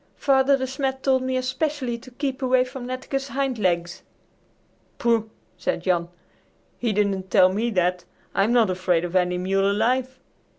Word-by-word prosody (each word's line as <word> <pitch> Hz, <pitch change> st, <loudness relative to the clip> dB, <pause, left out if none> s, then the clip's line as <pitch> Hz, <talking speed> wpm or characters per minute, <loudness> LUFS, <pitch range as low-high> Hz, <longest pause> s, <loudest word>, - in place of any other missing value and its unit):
"Father 275 Hz, 0 st, +3 dB
De 260 Hz, -, -2 dB
Smet 265 Hz, 0 st, -3 dB
told 260 Hz, -1 st, +3 dB
me 260 Hz, 0 st, -1 dB
especially 255 Hz, 0 st, -2 dB
to 255 Hz, -, -13 dB
keep 265 Hz, +1 st, -4 dB
away 255 Hz, -1 st, +3 dB
from 255 Hz, -1 st, -8 dB
Netteke's 265 Hz, +2 st, -3 dB
hind 270 Hz, -3 st, -2 dB
legs." 175 Hz, -3 st, 0 dB, 1.0 s
"Pooh!" 230 Hz, -2 st, +1 dB, 0.3 s
said 175 Hz, -1 st, -2 dB
Jan; 175 Hz, -2 st, +1 dB, 0.7 s
"he 235 Hz, -2 st, 0 dB
didn't 200 Hz, -2 st, 0 dB
tell 185 Hz, +2 st, +5 dB
me 225 Hz, +4 st, 0 dB
that. 180 Hz, -3 st, 0 dB, 0.3 s
I'm 200 Hz, +4 st, +2 dB
not 230 Hz, -5 st, +4 dB
afraid 180 Hz, -2 st, +1 dB
of 175 Hz, +1 st, -6 dB
any 180 Hz, -1 st, +2 dB
mule 195 Hz, +2 st, +1 dB
alive. 255 Hz, +5 st, 0 dB
240 Hz, 160 wpm, -24 LUFS, 185-260 Hz, 1.0 s, tell